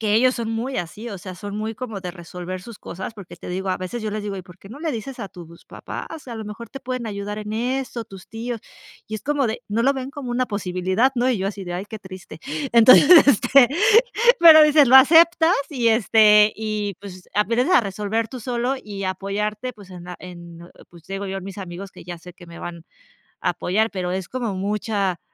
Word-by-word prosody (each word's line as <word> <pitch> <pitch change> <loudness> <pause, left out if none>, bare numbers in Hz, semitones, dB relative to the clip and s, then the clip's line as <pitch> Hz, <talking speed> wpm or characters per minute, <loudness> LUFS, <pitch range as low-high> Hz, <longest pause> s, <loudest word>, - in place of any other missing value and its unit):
que 210 -2 +1
ellos 255 +3 +4
son 230 -1 -4
muy 235 +4 -3
así, 180 +7 -5
o 200 -4 -7
sea, 185 0 -9
son 205 +1 -7
muy 220 +1 -4
como 225 -5 -6
de 180 -2 -5
resolver 180 +1 -8
sus 230 +2 -11
cosas, 190 +5 -7
porque 200 -4 -11
te - - -10
digo, 190 +2 -4
a 185 - 0
veces 185 +6 -5
yo 215 - -3
les 210 0 -4
digo: 200 -1 -4
"¿Y 185 - -7
por 180 0 -16
qué 195 - -15
no 235 +8 -11
le 325 -1 -2
dices 245 +2 -6
a 200 - -5
tus 170 -2 -13
papás? 320 -3 -8
A 235 - -6
lo 220 -1 -6
mejor 210 +2 -8
te 270 - -9
pueden 255 -2 -4
ayudar 205 0 -5
en 210 0 -6
eso, 250 0 -3
tus 195 -4 -13
tíos". 230 0 -5 0.5
Y 220 - -6
es 215 - -6
como 290 -2 0
de 225 +2 -4
no 215 +3 0
lo 275 - +4
ven 265 0 -5
como 270 -3 -7
una 250 +1 0
posibilidad, 190 +4 0
¿no? 245 +2 +2
Y 240 - 0
yo 190 - -2
así 200 0 -5
de: 175 -1 -5
"Ay, 190 +3 -5
qué 220 -1 -8
triste". 190 -2 -11 0.3
Entonces, 235 +4 +7 0.2
este, 270 0 +5 0.7
pero 320 -2 +10
dices, 300 -3 +5
lo 260 - +8
aceptas, 325 +4 +6 0.2
y 250 -5 -1
este, 215 -1 +5
y 215 -2 -3
pues 185 -2 -11
aprendes 230 - +1
a - - +7
resolver 210 +2 -2
tú 255 - -8
solo 245 +2 -1
y 200 -2 -6
apoyarte, 210 +5 -3
pues 205 -4 -16
en 180 -1 -10
la 180 0 -8
en 170 -2 -11
en, 175 - -14 0.2
pues 170 -2 -17
te 195 - -7
digo 200 +1 -4
yo 195 0 -4
mis 190 0 -9
amigos 190 +1 -8
que - - -13
ya 175 0 -7
sé 180 +2 -13
que 175 - -15
me 170 0 -11
van 170 -1 -8 0.6
a - - +2
apoyar, 215 +5 0
pero 180 -2 -3
es 185 -2 -4
como 240 -5 -3
mucha 200 -1 -2
210 Hz, 235 wpm, -22 LUFS, 190-240 Hz, 0.7 s, pero